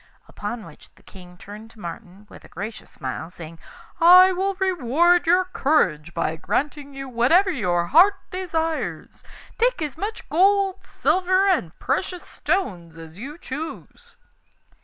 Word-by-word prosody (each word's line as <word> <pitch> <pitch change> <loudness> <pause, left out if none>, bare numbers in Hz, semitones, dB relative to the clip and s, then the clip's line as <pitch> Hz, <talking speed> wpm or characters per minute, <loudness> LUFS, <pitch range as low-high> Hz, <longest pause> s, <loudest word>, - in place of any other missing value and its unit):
Upon 215 +2 -6
which - - -15
the - - -24
King 180 -2 -15
turned 210 +4 -11
to 225 - -19
Martin 185 +2 -9
with - - -15
a - - -14
gracious 210 +5 -8
smile, 130 +5 -6
saying: 165 -2 -11 0.4
'I 365 +2 +8
will 380 +2 -1
reward 345 -1 +2
your 365 +2 +4
courage 175 - 0
by 160 - -1
granting 280 - -3
you 270 0 -6
whatever 265 +11 +3
your 180 - 0
heart 355 - +5 0.2
desires. 330 -3 -3 0.4
Take - - +2
as 300 +1 -6
much 430 +4 -5
gold, 390 +2 +2
silver, 375 +1 +1
and 310 - 0
precious 360 -2 -2
stones 175 - -3
as 165 +2 -12
you 285 +7 -8
choose. 325 - -8
295 Hz, 140 wpm, -23 LUFS, -, 0.4 s, I